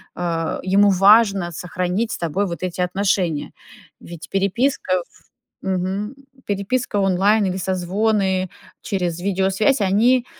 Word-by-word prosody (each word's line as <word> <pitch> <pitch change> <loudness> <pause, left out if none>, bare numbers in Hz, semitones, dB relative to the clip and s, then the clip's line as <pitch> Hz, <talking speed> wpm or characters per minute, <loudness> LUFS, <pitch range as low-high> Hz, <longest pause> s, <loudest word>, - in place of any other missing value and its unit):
э, 165 -2 -2
ему 200 +2 +4
важно 195 -1 +4
сохранить 180 +6 -2
с - - -3
тобой 175 +4 -1
вот 170 +1 -6
эти 180 0 -3
отношения. 180 -3 0 0.5
Ведь 170 -1 -10
переписка, 195 -2 0
в - - -25 0.4
мгм. 190 +5 -2 0.3
Переписка 205 +3 -2
онлайн 195 +3 +3
или 185 -1 -1
созвоны 190 +1 0 0.3
через 180 -5 -2
видеосвязь, 195 +7 +1
они 230 +6 +3
190 Hz, 115 wpm, -21 LUFS, 180-205 Hz, 0.5 s, ему